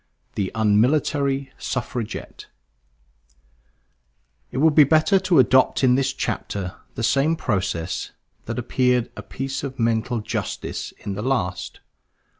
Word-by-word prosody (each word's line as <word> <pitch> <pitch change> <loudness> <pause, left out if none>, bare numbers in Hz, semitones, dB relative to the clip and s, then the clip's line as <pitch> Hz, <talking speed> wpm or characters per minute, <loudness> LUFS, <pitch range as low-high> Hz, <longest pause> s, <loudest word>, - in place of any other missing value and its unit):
THE 95 -2 -2
UNMILITARY 135 +5 +2
SUFFRAGETTE 120 -2 -5 2.0
It - - -5
will 155 +4 +5
be 150 0 +7
better 155 +7 +4
to 185 -3 +2
adopt 130 +1 +4
in 125 -1 +5
this 135 +1 +2
chapter 95 -2 -3 0.2
the 115 - -3
same 140 +7 +3
process 95 - -2 0.4
that - - -4
appeared 125 -2 +1
a - - -6
piece 135 +1 -5
of 135 -1 -5
mental 115 +1 0
justice 105 - -4
in 100 - -2
the 100 - -4
last. 105 -8 -2
130 Hz, 120 wpm, -23 LUFS, 110-140 Hz, 2.0 s, be